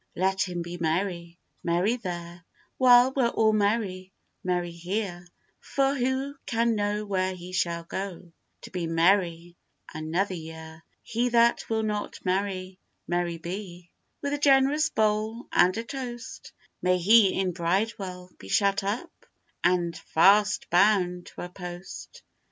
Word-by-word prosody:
Let 190 +1 +1
him 175 -1 -3
be 175 +1 -7
merry, 170 +1 -2 0.3
merry 175 +7 +1
there, 175 -5 -7 0.4
While 250 0 +6
we're 260 -3 +3
all 220 -2 +2
merry, 200 -3 0 0.3
merry 180 -1 -1
here, 175 +1 -4 0.3
For 275 0 0
who 265 +2 -1
can 230 0 +1
know 210 0 -1
where 190 -2 -1
he 180 0 -10
shall 170 -2 -1
go, 180 -1 -6 0.3
To - - -11
be 180 -3 -3
merry 170 0 +2 0.4
another 165 +5 -1
year. 160 -1 -9 0.2
He 240 +2 -1
that 235 0 +3
will 220 -1 0
not 210 -1 -3
merry, 185 0 -2 0.3
merry 175 -1 -1
be, 175 0 -7 0.3
With 285 0 -1
a 290 - -1
generous 285 +2 +4
bowl 215 +2 0
and 180 +3 +4
a 225 - -2
toast, 250 0 -7 0.3
May 180 0 +3
he 195 +2 +5
in 190 -1 +1
Bridewell 180 +1 -2
be 95 - -11
shut 200 - +2
up, 225 - -3 0.5
And 175 -1 +2
fast 205 +7 +3
bound 180 -1 +3
to - - -10
a 175 - -6
post. 180 - -9
190 Hz, 140 wpm, -27 LUFS, 175-220 Hz, 0.5 s, While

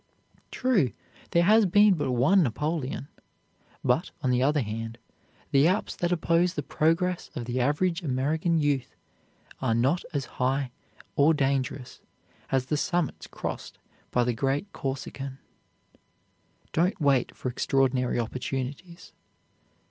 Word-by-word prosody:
True, 195 - +1 0.4
there 170 - +3
has 215 +2 +5
been 205 +2 +6
but 145 -6 -1
one 140 +11 +4
Napoleon; 145 +1 -2 0.8
but, - - +1
on 130 - +2
the 125 0 +2
other 145 +2 +3
hand, 115 +2 -5 0.5
the 140 +3 +5
Alps 190 +4 0
that 175 0 0
oppose 175 +1 +2
the 145 - -2
progress 170 +5 0
of 120 - -4
the 120 +2 -2
average 165 +7 +1
American 155 +4 0
youth 145 -4 0 0.7
are 115 - +1
not 135 +9 +2
as 140 -5 -2 0.2
high 130 0 +1 0.4
or 155 +3 +5
dangerous 135 -2 -1 0.5
as 130 -1 +2
the 150 +3 -1
summits 175 -1 -1
crossed - - -6 0.3
by 125 - +2
the 120 0 0
great 140 - -1
Corsican. 135 0 -5 1.4
Don't 180 +4 +1
wait 140 -5 +2
for 130 - -3
extraordinary 130 0 +1
opportunities. 135 +8 -5
140 Hz, 125 wpm, -27 LUFS, 130-170 Hz, 1.4 s, been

